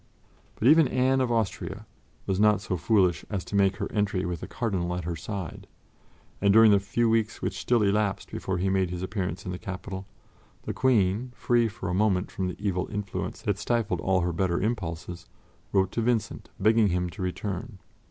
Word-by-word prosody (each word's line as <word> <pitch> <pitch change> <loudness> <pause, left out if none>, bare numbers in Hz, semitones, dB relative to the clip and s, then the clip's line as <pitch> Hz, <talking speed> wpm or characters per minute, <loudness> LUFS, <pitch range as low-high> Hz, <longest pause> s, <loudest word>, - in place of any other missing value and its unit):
But 115 - +1
even 155 0 +7
Anne 130 +1 +2
of 125 -2 0
Austria 110 -4 -2 0.4
was 95 0 -1
not 105 -1 +5
so 100 -2 -3
foolish 90 0 +2
as 100 -4 -3
to - - -5
make 100 -1 +3
her 100 -1 -3
entry 105 -3 0
with 85 -1 -3
the - - -7
Cardinal 95 -7 -2
at 90 - -4
her 85 +1 -3
side, 90 +2 -6 0.7
and 100 0 +4
during 110 +1 +7
the 100 - +5
few 115 +4 0
weeks 110 -1 0
which - - -2
still 120 -3 +2
elapsed 100 0 0
before 95 -1 -3
he 90 +2 0
made 95 -1 +1
his 90 0 -4
appearance 95 -2 -3
in 90 - -3
the 90 - -5
capital, 95 0 -6 0.6
the - - -3
Queen, 120 -1 +2
free 120 -1 +2
for 105 -2 -6
a 90 - -1
moment 95 -1 +1
from 95 - -2
the 90 - -5
evil 95 -3 -2
influence 100 -2 -4
that 100 -1 -1
stifled 115 -1 0
all 95 -1 +2
her 85 0 -1
better 85 0 0
impulses, 90 -5 -3 0.4
wrote 95 -1 +2
to 115 - -1
Vincent, 115 -1 -1
begging 110 +1 +4
him 90 -1 0
to 80 - -9
return. 95 +3 -4
100 Hz, 195 wpm, -27 LUFS, 90-110 Hz, 0.7 s, even